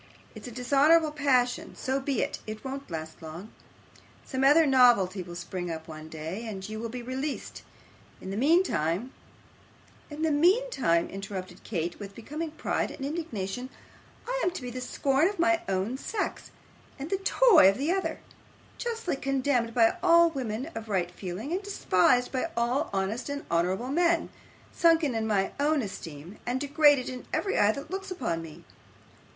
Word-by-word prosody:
It's - - -9
a - - -7
dishonourable 285 +6 +4
passion. 265 -5 +1
So 265 +1 -1
be 270 -2 0
it; - - -4
it 215 +2 -7
won't 275 +1 -6
last 160 -1 -6
long. 165 +7 -9 0.7
Some 260 -1 -2
other 300 +4 +6
novelty 240 -9 +4
will 175 -1 -8
spring 175 +1 -5
up 160 -1 -6
one 155 -1 -9
day, 160 +9 -6
and 195 -3 -6
you 215 0 -6
will 230 +1 -4
be 245 +1 -6
released. 265 +4 -4 0.6
In 190 - -7
the - - -3
mean 315 - +4
time 180 - -1 0.5
' - - -28
'In 300 +1 -5
the 320 - +2
mean 365 +12 +4
time,' 170 - +2
interrupted 190 -2 -7
Kate, 175 -4 -3
with 200 -1 -8
becoming 300 +8 -5
pride 305 - -2
and 270 - -6
indignation, 250 - -4 0.6
'I - - -1
am - - +3
to 360 - -6
be 245 - -5
the 255 +1 -5
scorn 275 +4 +1
of 405 +1 -4
my 340 0 +3
own 195 +8 -1
sex, 425 +4 -3 0.5
and 285 +5 -7
the 390 - +2
toy 390 - +6
of 195 - 0
the 290 +5 0
other; 385 +1 -2 0.6
justly 460 -8 -2
condemned 265 -4 0
by 230 +6 +4
all 340 -1 +6
women 260 +1 -4
of 225 -1 -7
right 180 -3 0
feeling, 185 - -6
and 365 +3 -1
despised 250 - +2
by 265 +5 -1
all 240 +3 +1
honest 195 +7 -2
and 285 0 -4
honourable 185 +8 0
men; 340 +3 +2 0.4
sunken 330 -5 +3
in 220 -1 -1
my 195 -3 +1
own 295 -1 +2
esteem, 170 -2 -8
and 245 +2 -1
degraded 285 -1 +4
in 255 -1 -7
every 395 - 0
eye 205 0 +5
that 280 +7 -8
looks 385 0 -4
upon 230 - -2
me. 160 -2 -11
255 Hz, 175 wpm, -28 LUFS, 195-305 Hz, 0.7 s, other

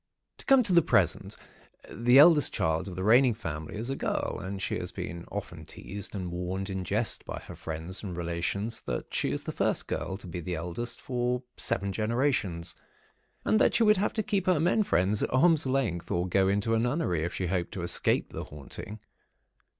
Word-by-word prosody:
"To - - -11
come 270 -2 +6
to 195 - 0
the 170 - +7
present, 115 - +1 0.6
the 120 +3 +4
eldest 150 0 +7
child 80 +3 0
of 95 - -6
the 95 - -3
reigning 120 +3 +5
family, 80 -8 -6
is 115 +5 -3
a - - -1
girl, - - -2
and 95 +2 -5
she - - -2
has - - -5
been 85 +2 -6
often - - -6
teased 100 +2 -7
and 90 -3 -4
warned 95 +3 -3
in 95 -1 -3
jest - - -1
by - - -6
her - - -9
friends 80 +4 -5
and 90 -5 -6
relations 90 +6 -2
that - - -4
she - - 0
is - - -2
the - - -4
first - - 0
girl 95 - -3
to 100 - -13
be 90 0 -5
the 90 +1 -3
eldest 90 +9 -4
for 125 0 -1
seven 100 0 0
generations, 110 - -1 0.7
and 215 - +3
that - - +3
she 235 - +4
would 210 -2 +5
have 205 - 0
to 215 - -1
keep 195 -2 -1
her 180 -4 +4
men 180 +7 +3
friends 100 - +1
at - - -1
arm's 155 +2 +4
length, 125 -11 -1
or 90 +1 0
go 95 +1 +3
into 100 +3 +1
a 115 - +3
nunnery, 120 - 0
if 85 - -3
she 95 - -2
hoped 90 -1 -1
to 90 - -4
escape 85 - +1
the - - -5
haunting. 75 +8 -9
100 Hz, 205 wpm, -29 LUFS, 90-130 Hz, 0.7 s, the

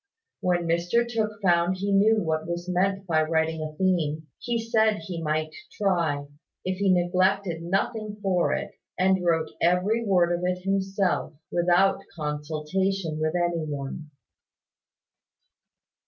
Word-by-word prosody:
When 175 -1 +1
Mr 175 +8 +1
Tooke 215 -3 -2
found 175 0 +3
he 200 +2 -2
knew 210 +2 +4
what 160 -1 -1
was 175 +1 -4
meant 195 +2 0
by 160 -3 +2
writing 160 0 0
a 155 -1 -6
theme, 160 -5 0
he 240 -1 -1
said 220 -1 +2
he 170 -1 -5
might 155 0 -1 0.2
try, 170 -8 0 0.4
if 185 0 -2
he 200 -2 +3
neglected 180 0 +1
nothing 210 +4 -2
for 190 -4 +1
it, - - -4 0.3
and 190 0 +2
wrote 165 -2 +1
every 185 +7 +2
word 180 -5 +3
of 175 +1 -2
it 180 0 -1
himself, 195 -4 0 0.2
without 175 +3 +3
consultation 155 +3 -2
with 155 +2 0
any 175 -2 0
one. 150 +1 -5
180 Hz, 135 wpm, -26 LUFS, 160-195 Hz, 0.4 s, knew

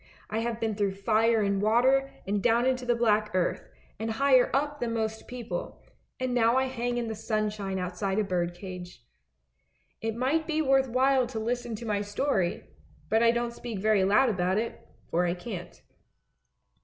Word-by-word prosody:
I 220 - 0
have 230 0 -2
been 225 -1 -1
through 200 -2 -1
fire 220 +2 +2
and 200 -1 0
water, 260 +5 +3 0.2
and 200 +1 -1
down 240 +2 +3
into 255 -1 0
the 240 - +3
black 215 -2 +2
earth, 180 -2 -1 0.3
and 225 +1 -2
higher 260 0 +4
up 290 +2 0
than 230 -1 -2
most 220 0 -3
people, 245 -2 -6 0.4
and 255 -1 -1
now 235 0 +3
I 265 - +3
hang 245 -2 -2
in 240 -1 -2
the 220 - -3
sunshine 215 -3 -2
outside 190 +2 -2
a 215 - +3
bird 175 -3 -1
cage. 180 -7 -9 1.0
It 225 0 -2
might 275 +6 0
be 315 -2 0
worth 270 -3 +3
while 260 +1 +3
to 230 -2 -5
listen 240 +1 -2
to 230 - -8
my 205 -2 0
story, 205 -2 -1 0.5
but 220 +1 +3
I 235 - +5
don't 235 0 0
speak 235 -3 -6
very 210 0 +3
loud 210 +7 +4
about 185 -2 0
it, 230 +1 -2 0.3
for 175 +2 +2
I 170 - 0
can't." 180 -1 -7
225 Hz, 180 wpm, -28 LUFS, 205-245 Hz, 1.0 s, I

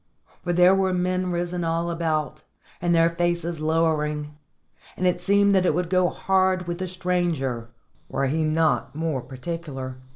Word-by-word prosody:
For 175 - -2
there 180 +2 +6
were 190 -1 +1
men 185 0 0
risen 175 0 -2
all 165 +1 -1
about, 155 -2 -2 0.4
and 175 0 +2
their 165 0 +5
faces 170 -1 -1
lowering, 150 -2 0 0.6
and 185 - -1
it 180 -1 +1
seemed 200 +2 +4
that 190 -1 +4
it 150 - +2
would 180 0 -2
go 185 -1 +3
hard 185 -1 +1
with 175 0 -4
the 185 - -2
stranger 170 -10 -1 0.4
were 135 - -1
he 155 +4 0
not 155 -3 +1
more 155 -4 -1
particular. 135 0 -6
170 Hz, 160 wpm, -24 LUFS, 155-180 Hz, 0.6 s, there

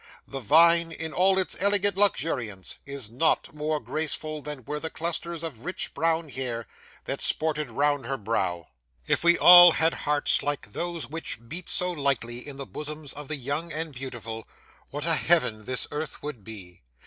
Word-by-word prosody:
The 135 - -6
vine, 170 +4 +5
in 160 -1 -5
all 190 +1 +3
its 190 - +1
elegant 200 0 +3
luxuriance, 130 - 0
is 140 -6 -4
not 135 +7 +1
more 150 0 -2
graceful 155 0 -3
than 145 -4 -6
were 150 0 -4
the 160 - -3
clusters 170 0 -3
of 140 -9 -6
rich 180 +3 -3
brown 165 +1 0
hair 125 -4 -3 0.4
that - - -4
sported 150 -3 0
round 145 +1 0
her 135 - -2
brow. 90 -6 -2 0.4
'If - - 0
we 170 0 +5
all 175 -1 +10
had 160 +1 +2
hearts 150 0 +1
like 145 -8 -4
those 170 -2 -4
which 150 -6 -7
beat 170 +8 -5
so 180 0 +1
lightly 135 -5 -2
in 140 -2 -9
the 140 - -6
bosoms 150 +1 -7
of 145 -1 -9
the 155 - -2
young 145 +5 -3
and 155 0 -4
beautiful, 120 -4 -7 0.4
what 145 +2 -4
a 165 - +4
heaven 155 -11 +1
this 130 +2 -1
earth 150 0 -5
would 145 -8 -6
be! 95 -5 -11
150 Hz, 175 wpm, -26 LUFS, 130-165 Hz, 0.4 s, all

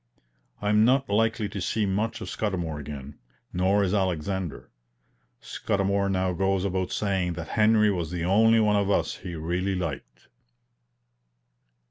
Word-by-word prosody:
I 105 - +1
am 105 +1 +4
not 130 -1 +2
likely 110 +1 +1
to 100 - -5
see 105 +4 0
much 105 +4 -1
of - - -5
Scudamour 85 -8 -3
again, 70 -1 -8 0.3
nor 95 +3 +2
is 95 0 0
Alexander. 95 -3 -2 0.7
Scudamour 100 0 -1
now 95 -1 0
goes 95 +1 0
about 95 -1 -1
saying 95 -4 0
that 85 -1 -7
Henry 105 -1 +4
was 85 -5 -2
the 85 -1 -3
only 110 +5 +4
one 105 -1 +3
of 100 -1 +1
us 100 - 0
he 90 -2 -7
really 90 +4 -1
liked. 85 -7 -6
95 Hz, 145 wpm, -26 LUFS, 90-105 Hz, 0.7 s, am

